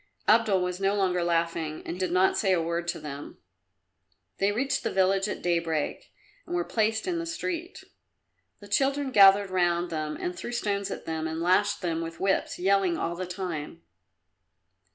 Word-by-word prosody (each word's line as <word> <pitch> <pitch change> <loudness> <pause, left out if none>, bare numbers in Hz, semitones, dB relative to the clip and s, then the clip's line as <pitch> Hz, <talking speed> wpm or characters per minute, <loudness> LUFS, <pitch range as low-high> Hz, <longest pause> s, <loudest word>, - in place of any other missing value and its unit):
Abdul 215 -4 +4
was 180 0 -3
no 195 +1 +1
longer 180 -3 +1
laughing, 165 -2 -1
and 175 - -5
did 185 -2 -1
not 185 +1 +3
say 195 -3 +2
a 180 - +2
word 170 +1 -2
to 175 - -2
them. 145 -1 -8 1.0
They 195 +1 +2
reached 265 +6 0
the - - -1
village 195 +1 +2
at - - -5
daybreak 170 -3 -1 0.4
and 350 - -3
were 350 - +1
placed 220 -1 0
in 355 -2 -1
the 335 - -3
street. 345 +2 -4 0.8
The 205 - -11
children 275 +5 +1
gathered 200 -2 +6
round 175 -1 +1
them 155 -1 -3
and 180 - -3
threw 240 - -6
stones 200 -4 -1
at - - -6
them 160 0 -3
and 160 0 -4
lashed 185 +4 +2
them 165 -2 -1
with 165 0 -6
whips, 195 0 0
yelling 190 -1 +2
all 170 +1 -2
the 185 +1 -5
time. 170 -3 -5
185 Hz, 175 wpm, -27 LUFS, 170-205 Hz, 1.0 s, gathered